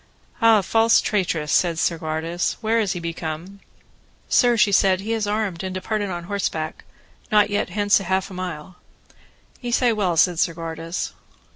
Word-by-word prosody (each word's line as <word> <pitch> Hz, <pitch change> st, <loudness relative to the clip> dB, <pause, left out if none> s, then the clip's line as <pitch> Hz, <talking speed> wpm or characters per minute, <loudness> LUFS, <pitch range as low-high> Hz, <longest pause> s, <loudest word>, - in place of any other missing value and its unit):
Ah, 225 Hz, -2 st, +6 dB
false 225 Hz, +3 st, +4 dB
traitress, 170 Hz, -7 st, -1 dB
said 170 Hz, -2 st, +2 dB
Segwarides, 165 Hz, +1 st, -1 dB
where 225 Hz, 0 st, +1 dB
is 205 Hz, -3 st, 0 dB
he 175 Hz, -, -5 dB
become? 170 Hz, +3 st, -6 dB, 0.7 s
Sir, 240 Hz, -2 st, +3 dB
she 210 Hz, -2 st, +4 dB
said, 190 Hz, -1 st, +4 dB
he 220 Hz, +3 st, -2 dB
is 220 Hz, -2 st, -1 dB
armed, 205 Hz, -5 st, -2 dB
and 185 Hz, 0 st, -4 dB
departed 205 Hz, +2 st, -2 dB
on 175 Hz, -2 st, -4 dB
horseback, 170 Hz, -5 st, -3 dB, 0.5 s
not 210 Hz, -1 st, +4 dB
yet 205 Hz, -, 0 dB
hence 205 Hz, +2 st, +2 dB
half 190 Hz, 0 st, -1 dB
a -, -, -8 dB
mile. 180 Hz, -1 st, -6 dB, 0.8 s
Ye 245 Hz, -, -4 dB
say 240 Hz, 0 st, +2 dB
well, 185 Hz, -6 st, 0 dB
said 175 Hz, 0 st, +3 dB
Segwarides. 165 Hz, 0 st, -3 dB
185 Hz, 155 wpm, -22 LUFS, 170-210 Hz, 0.8 s, Ah